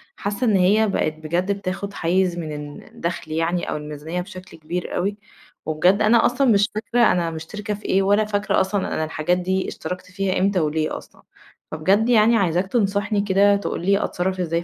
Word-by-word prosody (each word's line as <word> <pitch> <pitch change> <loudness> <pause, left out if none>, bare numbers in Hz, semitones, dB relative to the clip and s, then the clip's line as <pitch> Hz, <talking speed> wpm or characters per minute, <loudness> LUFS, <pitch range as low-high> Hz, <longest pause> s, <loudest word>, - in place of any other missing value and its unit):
حاسة 205 +5 -2
إن 210 - +3
هي 205 +4 +4
بقت 155 -5 0
بجد 170 +5 -2
بتاخد 200 0 -4
حيّز 175 +1 +1
من 155 -3 -4
ال 145 0 -8
الدخل 170 -2 -5
يعني 165 +2 -1
أو - - -2
الميزانية 150 +4 -5
بشكل 185 -1 -11
كبير 170 +3 -5
أوي 200 +3 -1 0.5
وبجد 175 +6 +2
أنا 220 +2 +4
أصلًا 250 +2 +2
مش 205 +1 +3
فاكرة 235 +2 +2
أنا 170 -2 0
مشتركة 205 +6 -5
في 205 - -9
إيه 195 - +2
ولا 205 +2 +3
فاكرة 205 0 +1
أصلًا 190 +1 -1
أنا 155 - -1
الحاجات 155 +3 0
دي 185 +1 -1
اشتركت 180 0 -6
فيها 195 0 -1
امتى 195 -1 +2
وليه 155 0 -1
أصلًا! - - -15 0.5
فبجد 195 +9 +2
يعني 230 0 +5
عايزاك 180 -1 +1
تنصحني 205 -1 0
كده 200 0 +4
تقول 200 -3 -3
لي 200 +1 +3
أتصرف 185 +1 -2
إزاي 170 -1 -1
190 Hz, 185 wpm, -22 LUFS, 170-205 Hz, 0.5 s, يعني